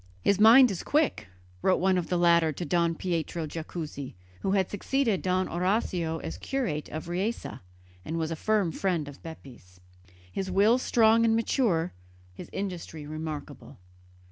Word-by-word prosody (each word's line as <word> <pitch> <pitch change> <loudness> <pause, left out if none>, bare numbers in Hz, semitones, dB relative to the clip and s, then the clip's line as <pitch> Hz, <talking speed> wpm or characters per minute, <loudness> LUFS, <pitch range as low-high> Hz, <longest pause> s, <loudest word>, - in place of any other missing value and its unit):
"His 200 - +3
mind 235 +3 +8
is 185 - -4
quick," 300 - 0 0.3
wrote 185 - +3
one 190 +1 +3
of 180 -2 -1
the 180 - +1
latter 170 -2 +4
to 175 +4 -5
Don 170 +1 +1
Pietro 170 -2 -2
Jacuzzi, 155 - -6 0.2
who 190 - -1
had 190 -2 +2
succeeded 225 +1 0
Don 185 0 0
Orazio 175 -2 -1
as 80 - -6
curate 205 - -2
of 155 +2 -6
Riese 190 +7 -2 0.6
and 160 +9 -4
was 160 0 -2
a - - -1
firm 205 0 +1
friend 170 -4 -1
of 145 - -11
Bepi's, 120 - -12 0.5
"his 190 - -3
will 205 +6 +4
strong 230 -2 +4
and 225 -1 +3
mature, 215 - +1 0.4
his - - -10
industry 175 -5 -5
remarkable." 155 -2 -7
175 Hz, 155 wpm, -28 LUFS, 160-205 Hz, 0.6 s, mind